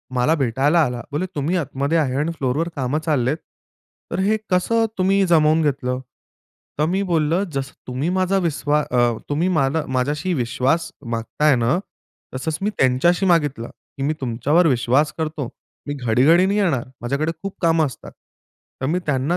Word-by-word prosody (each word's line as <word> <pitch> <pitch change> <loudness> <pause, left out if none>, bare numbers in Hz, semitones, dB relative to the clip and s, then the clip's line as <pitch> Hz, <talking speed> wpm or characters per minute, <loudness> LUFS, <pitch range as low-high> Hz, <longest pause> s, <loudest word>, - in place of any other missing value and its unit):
मला 125 +6 +3
भेटायला 140 +4 +2
आला. 125 -2 -4
बोले 150 +6 -1
तुम्ही 155 +5 0
आतमध्ये 140 0 -1
आहे 135 -5 0
आणि 155 +3 0
फ्लोरवर 140 +5 0
कामं 140 +2 -1
चाललेत, 145 -1 +1 0.7
तर - - -2
हे 215 +2 +2
कसं 225 +5 +2
तुम्ही 195 +1 +3
जमवून 160 -1 +4
घेतलं? 130 -3 -1 0.8
तर 150 - +3
मी 185 +4 0
बोललं, 170 +1 +1
जसं 135 0 -3
तुम्ही 130 +6 -2
माझा 185 +1 +2
विश्वा 150 -3 0
अ, 125 - +2 0.3
तुम्ही 155 +5 +1
मला 145 +2 +1
माझ्याशी 145 +7 -1
विश्वास 135 +4 0 0.2
मागताय 135 +5 +1
ना, 120 +7 +1 0.6
तसंच 150 +4 -2
मी 205 - +1
त्यांच्याशी 140 +9 +3
मागितलं, 145 -10 +1 0.3
की 135 - -3
मी 150 - +1
तुमच्यावर 135 +8 +2
विश्वास 135 +3 +2
करतो, 155 -5 -3 0.4
मी 145 - -2
घडी-घडी 135 +8 +3
नाही 200 +2 +1
येणार, 160 -12 +1 0.2
माझ्याकडे 140 +7 -1
खूप 195 - -5
कामं 165 -2 +3
असतात. 130 - -8 0.7
तर - - -1
मी 170 +6 +1
त्यांना 135 -3 0
150 Hz, 160 wpm, -21 LUFS, 130-170 Hz, 0.8 s, जमवून